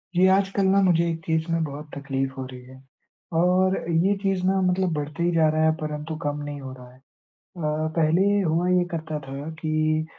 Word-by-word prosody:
जी, 185 +1 +5
आजकल 195 0 +1
ना 195 +1 +4
मुझे 170 -3 +3
एक 165 -1 -3
चीज़ 160 0 0
में 165 -1 +1
बहुत 150 +1 -6
तकलीफ़ 135 -1 -2
हो 130 - -3
रही 125 -1 -10
है, 130 - -13 0.6
और 180 +3 +3
ये 170 +5 +3
चीज़ 195 -2 0
ना, 190 0 +2
मतलब 180 -1 +1
बढ़ते 150 +2 -3
ही 175 - +2
जा 160 -1 +4
रहा 155 +1 +1
है, 160 - +5
परंतु 155 0 -5
कम 145 0 -2
नहीं 145 -1 -6
हो 130 -1 -7
रहा 125 -1 -12
है। 130 - -20 0.4
अ, 155 -2 -3
पहले 165 +2 +3
ये 205 0 +3
हुआ 170 +1 +1
ये 180 -1 +3
करता 160 -2 -4
था 140 +3 -6
कि 155 0 0
160 Hz, 210 wpm, -24 LUFS, 150-180 Hz, 0.6 s, जी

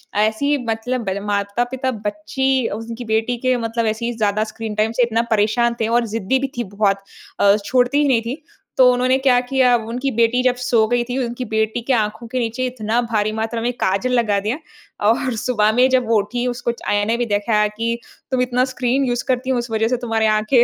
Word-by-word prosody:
ऐसे 220 +5 +1
ही 290 +1 +2
मतलब 235 +2 -2
बल 190 +1 -2
माता-पिता 240 +6 -1 0.2
बच्ची 255 +5 0
अज़ 225 +2 -5
उनकी 235 +1 -6
बेटी 225 +2 0
के 255 - +4
मतलब 230 0 -2
ऐसे 220 +2 -1
ही 240 - -1
ज़्यादा 215 -1 +1
स्क्रीन 220 -2 -5
टाइम 215 +1 +1
से 250 - +5
इतना 230 -1 +1
परेशान 225 +3 +2
थे 220 - +1
और 235 +1 +2
ज़िद्दी 230 +5 +1
भी 275 - -1
थी 240 - 0
बहुत। 200 -1 +2 0.4
अ, 200 0 +5
छोड़ती 255 +2 +2
ही 295 - +2
नहीं 250 -4 +3
थी। 255 +7 -6 0.3
तो 255 -1 +7
उन्होंने 250 +1 +2
क्या 260 -2 +4
किया? 255 -1 +3
उनकी 240 +4 -3
बेटी 235 +1 +2
जब 255 -1 +3
सो 245 -3 +2
गई 245 0 +2
थी 250 - -2
उनकी 240 +2 -5
बेटी 220 +1 -1
के 270 - +3
आँखों 220 0 -1
के 255 +2 -2
नीचे 240 +2 -2
इतना 235 -1 -1
भारी 215 -3 0
मात्रा 225 +1 -2
में 240 +2 0
काजल 200 +7 +1
लगा 210 -4 +1
दिया 230 +6 0 0.5
और 255 +1 +1
सुबह 215 -2 +2
में 250 +2 +5
जब 255 -2 +2
वो 225 -1 +3
उठी 240 +5 -3
उसको 245 -1 -2
च 235 - -13
आयने 205 +3 +1
भी 240 - 0
दिखाया 210 0 +1
कि 230 +1 -1 0.3
तुम 260 -1 +1
इतना 250 0 +1
स्क्रीन 250 +2 +1
यूज़ 245 -1 -1
करती 255 0 0
हो 255 - +1
उस 240 0 -5
वजह 220 0 +1
से 250 - +1
तुम्हारी 225 -2 0
आँखें 215 +3 +3
235 Hz, 220 wpm, -20 LUFS, 220-250 Hz, 0.5 s, तो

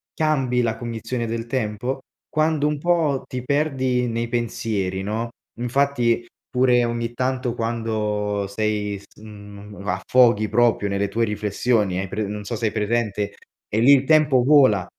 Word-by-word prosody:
cambi 135 -6 +1
la 115 -2 0
cognizione 115 +1 -4
del 115 +1 -4
tempo? 120 +1 -2 0.3
Quando 155 -1 +1
un 150 0 -1
po' 160 -4 +1
ti 125 -2 -4
perdi 130 -3 0
nei 115 0 -2
pensieri, 110 -5 -2
no, 110 +3 -2 0.3
infatti, 120 -2 +1 0.2
pure 125 -1 +3
ogni 115 0 -3
tanto 125 -1 -1
quando 105 -3 -1
sei, 105 -1 -2 0.2
mhmm, 105 -1 -11
a - - +1
affoghi 115 -4 +3
proprio 115 -2 +2
nelle 100 +1 0
tue 115 +4 0
riflessioni, 105 -1 0
hai 95 - -3
pre 105 +2 -2
non 105 +1 -5
so 120 - -3
hai 110 -2 +1
presente, 105 -2 -1 0.4
e 110 - 0
lì 135 +4 +7
il 135 -2 +4
tempo 150 -4 +4
vola, 130 -9 +5
115 Hz, 150 wpm, -22 LUFS, 105-130 Hz, 0.4 s, lì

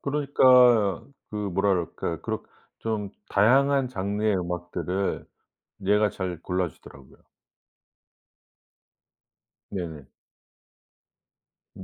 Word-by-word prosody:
그러니까 125 - +4 0.3
그 105 - -6
뭐라 100 -1 0
그럴까? 90 -3 -2
그렇 - - -3 0.4
좀 105 -3 -3 0.2
다양한 135 +5 +3
장르의 105 -1 -1
음악들을 90 +1 -3 0.6
얘가 105 +1 +3
잘 90 -3 -5
골라 90 0 -1
주더라고요. 70 -3 -16 2.5
네네. 85 -6 -5 1.7
음. 95 - -9
100 Hz, 180 characters per minute, -26 LUFS, 90-115 Hz, 2.5 s, 그러니까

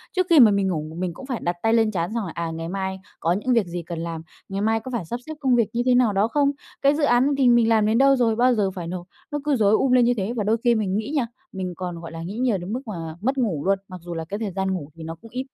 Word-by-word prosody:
Trước 370 - +2
khi 325 -4 +7
mà 220 -4 +8
mình 200 -1 +1
ngủ 165 -5 -1
một 160 - -10
mình 180 -2 -2
cũng 265 - -10
phải 255 -3 -3
đặt 175 0 0
tay 225 0 +3
lên 225 -2 +3
trán 175 -1 -2
xong 230 -3 -1
là, 170 - -5
à, 170 -1 -3
ngày 165 +1 -5
mai 190 0 -3 0.2
có 165 - +1
những 230 +6 0
việc 230 -5 +3
gì 175 0 -5
cần 165 0 -6
làm, 165 -1 -4 0.3
ngày 195 +1 -3
mai 225 +1 +2
có 255 +4 -8
phải 230 -9 -3
sắp 240 +8 -4
xếp 315 - -4
công 260 -4 +3
việc 230 -3 +2
như 240 - 0
thế 250 -1 +4
nào 240 -5 +3
đó 200 +3 +2
không. 280 +2 +2 0.3
Cái 280 +1 +4
dự 305 - -1
án 255 +1 +4
thì 255 -3 +4
mình 235 -1 +4
làm 220 -2 +4
đến 220 +2 +2
đâu 275 +1 +5
rồi, 230 -3 +2
bao 250 +1 +4
giờ 195 -3 +1
phải 175 -3 -6
nộp. 180 0 -6 0.2
Nó 295 - -1
cứ 295 -2 +2
rối 210 -3 +3
um 260 +4 +3
lên 250 -1 +5
như 245 - +3
thế 205 +4 -2
và 215 - -1
đôi 220 +3 +2
khi 240 -1 +4
mình 200 -3 0
nghĩ 220 +6 -3
nha, 250 -5 +1 0.2
mình 185 -2 -4
còn, 180 -2 -5
gọi 165 -1 -8
là, 165 - -7
nghĩ 200 +6 -6
nhiều 245 -5 +1
đến 180 +5 -5
mức 255 - -2
mà 165 -5 -5
mất 265 +4 0
ngủ 190 - -1
luôn, 195 0 +3
mặc 185 -1 -9
dù 175 0 -6
là 165 -1 -4
cái 205 +2 -3
thời 210 -4 -3
gian 190 0 -1
ngủ 155 -5 -5
thì 165 - -9
nó 165 +1 -6
cũng 230 - -14
ít. 255 - -3
210 Hz, 330 wpm, -23 LUFS, 180-245 Hz, 0.3 s, mà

